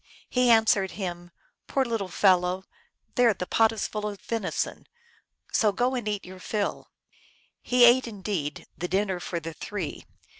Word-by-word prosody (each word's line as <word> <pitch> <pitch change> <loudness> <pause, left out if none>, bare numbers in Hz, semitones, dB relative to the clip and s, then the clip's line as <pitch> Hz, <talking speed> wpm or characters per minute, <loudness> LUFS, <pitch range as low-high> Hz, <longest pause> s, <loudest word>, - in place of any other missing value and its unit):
He 250 -1 +3
answered 220 -4 +4
him, 175 -3 -5 0.2
" - - -50
Poor 270 -1 +1
little 225 -5 -2
fellow! 185 0 +3 0.5
there, 240 -4 +4
the 180 - -4
pot 225 +4 +3
is 220 -3 -2
full 210 0 -3
of 205 -2 -6
venison, 230 -1 -3 0.6
so 215 -2 +3
go 245 +5 0
and 245 -4 -3
eat 205 -1 -2
your 185 +1 -10
fill." 205 +2 -3 0.7
He 245 -1 +5
ate, 245 +1 +6
indeed, 190 -8 -4
the 180 - -4
dinner 190 -1 0
for 175 -1 -4
the 165 0 -7
three. 185 -1 -6
205 Hz, 160 wpm, -27 LUFS, 185-230 Hz, 0.7 s, ate